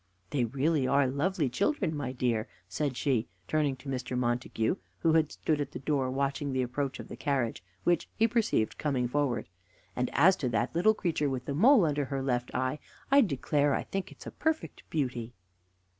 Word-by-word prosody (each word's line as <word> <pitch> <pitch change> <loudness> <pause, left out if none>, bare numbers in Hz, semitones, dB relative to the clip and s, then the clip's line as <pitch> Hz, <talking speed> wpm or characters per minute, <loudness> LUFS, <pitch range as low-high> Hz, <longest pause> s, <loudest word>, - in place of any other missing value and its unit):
"They 130 -4 +1
really 140 +3 +1
are 140 +1 +4
lovely 145 +5 0
children, 165 - 0
my 145 -3 -3
dear," 120 -4 0 0.2
said 130 +6 -2
she, 125 -5 +1 0.2
turning 150 -3 +1
to 135 - -14
Mr. 130 -1 -3
Montague, 120 - 0 0.2
who 165 -1 +2
had 160 -2 +3
stood 150 -2 -1
at 140 - -4
the - - -5
door 135 -1 0
watching 140 +1 -1
the 130 -1 +1
approach 135 +2 -3
of - - -7
the - - -8
carriage, 130 -6 -1 0.2
which 175 -2 +1
he 225 - +4
perceived 220 - 0
coming 130 -5 0
forward; 135 -2 0 0.5
"and 125 0 0
as 180 +6 +6
to 130 - -1
that 120 +1 0
little 215 +6 +4
creature 160 -7 0
with 130 -2 -3
the 140 - -2
mole 220 - +6
under 145 -2 0
her 135 0 -3
left 125 -2 0
eye, 130 +4 0 0.3
I 280 +1 +8
declare 145 - +1
I - - -1
think 195 -1 -4
it - - -14
is - - -17
a - - -6
perfect 320 0 -2
beauty." 125 -6 -2
140 Hz, 195 wpm, -30 LUFS, 125-155 Hz, 0.5 s, I